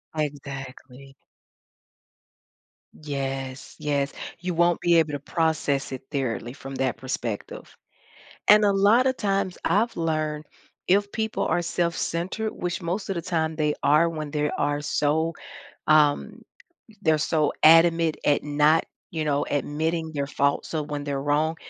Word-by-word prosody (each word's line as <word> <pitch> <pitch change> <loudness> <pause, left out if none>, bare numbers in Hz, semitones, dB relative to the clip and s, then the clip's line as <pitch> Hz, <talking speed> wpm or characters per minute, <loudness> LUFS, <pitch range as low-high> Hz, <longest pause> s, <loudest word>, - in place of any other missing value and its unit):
Exactly. 135 -2 -6 1.9
Yes, 135 -2 -4
yes, 140 -1 -1 0.3
you 180 +1 -3
won't 170 0 +2
be 170 -1 +3
able 155 -2 +2
to 145 - -3
process 150 -3 -1
it 130 - -5
thoroughly 125 -4 -3
from 135 -1 -9
that 130 -1 -1
perspective, 120 -5 -5 0.7
and 210 0 +7
a 200 - +4
lotta 225 +7 +4
times 195 -5 -1
I've 215 +7 +1
learned 155 -2 -1 0.4
if 200 +2 +3
people 220 -1 -1
are 175 - +1
self-centered, 175 +4 -2
which 175 0 -3
most 180 +4 -3
of 190 - -2
the 170 - -2
time 160 -3 -1
they 150 -1 +1
are 150 +4 +4
when 155 -2 -5
there 150 0 -1
are 145 0 0
so 155 +3 +1 0.5
um, 155 +9 +3 0.6
they're 160 -3 +3
so 155 0 +1
adamant 165 0 +6
at 145 - +3
not, 150 +2 +3 0.3
you 160 -2 -2
know, 145 -1 0
admitting 160 +3 -1
their 140 -2 -2
faults, 140 0 0
so 155 -2 -1
when 145 -1 -5
they're 140 -1 -2
wrong, 155 +3 +1
155 Hz, 140 wpm, -25 LUFS, 145-170 Hz, 1.9 s, and